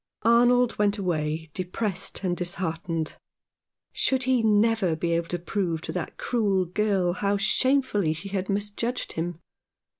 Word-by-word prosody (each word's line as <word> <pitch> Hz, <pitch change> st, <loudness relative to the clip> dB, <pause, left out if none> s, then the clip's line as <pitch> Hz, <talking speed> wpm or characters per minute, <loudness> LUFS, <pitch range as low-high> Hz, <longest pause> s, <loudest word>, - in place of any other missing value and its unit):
Arnold 240 Hz, +1 st, +4 dB
went 205 Hz, 0 st, +2 dB
away 160 Hz, -4 st, -2 dB
depressed 185 Hz, +1 st, -3 dB
and 180 Hz, -2 st, 0 dB
disheartened. 170 Hz, -2 st, -2 dB, 0.7 s
Should 260 Hz, -1 st, +1 dB
he 255 Hz, -1 st, +2 dB
never 215 Hz, -4 st, +3 dB
be 170 Hz, +2 st, -2 dB
able 170 Hz, 0 st, 0 dB
to 175 Hz, -, -2 dB
prove 175 Hz, -2 st, -2 dB
to -, -, -4 dB
that -, -, -5 dB
cruel 200 Hz, -6 st, +1 dB
girl 190 Hz, -1 st, +1 dB
how 200 Hz, +2 st, 0 dB
shamefully 205 Hz, -, +2 dB
she 165 Hz, +5 st, -7 dB
had 190 Hz, 0 st, -3 dB
misjudged 205 Hz, +5 st, -2 dB
him 165 Hz, 0 st, -3 dB
195 Hz, 140 wpm, -26 LUFS, 175-220 Hz, 0.7 s, Arnold